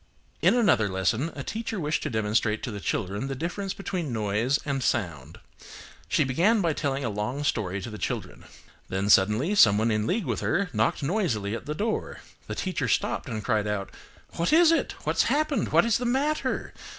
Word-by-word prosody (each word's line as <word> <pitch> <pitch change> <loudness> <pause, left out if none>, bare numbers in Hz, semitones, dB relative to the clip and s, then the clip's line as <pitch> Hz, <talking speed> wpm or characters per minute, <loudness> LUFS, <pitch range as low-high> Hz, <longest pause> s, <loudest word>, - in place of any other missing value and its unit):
In - - +4
another 180 - +3
lesson 110 - 0
a 140 - -5
teacher 225 - -4
wished 155 -1 -1
to - - -2
demonstrate 110 -1 0
to 125 - -3
the 105 - -5
children 100 +5 -2
the 135 - -3
difference 185 +7 -4
between 185 -7 -4
noise 110 +4 +1
and 140 -2 -1
sound. 85 - -2 0.7
She - - +2
began 175 - +2
by 170 -5 +1
telling 140 -2 -2
a - - 0
long 105 +8 -3
story 100 -8 -1
to - - -5
the 105 - -8
children. - - -4 0.4
Then 95 +2 0
suddenly 105 - +4
someone 110 - +5
in 105 0 0
league 205 0 0
with 115 -5 -1
her 180 - 0
knocked 160 - +1
noisily 135 - 0
at - - -8
the 150 - -3
door. 215 +5 -3 0.3
The - - -4
teacher 180 -9 -2
stopped - - 0
and 110 -2 -4
cried 105 0 0
out–"What 105 - -4
is 330 +1 +6
it! 330 - +1
What's - - +2
happened! 305 0 0
What - - +5
is 230 -2 +2
the 245 - -3
matter! 280 +5 -1
135 Hz, 185 wpm, -26 LUFS, -, 0.7 s, is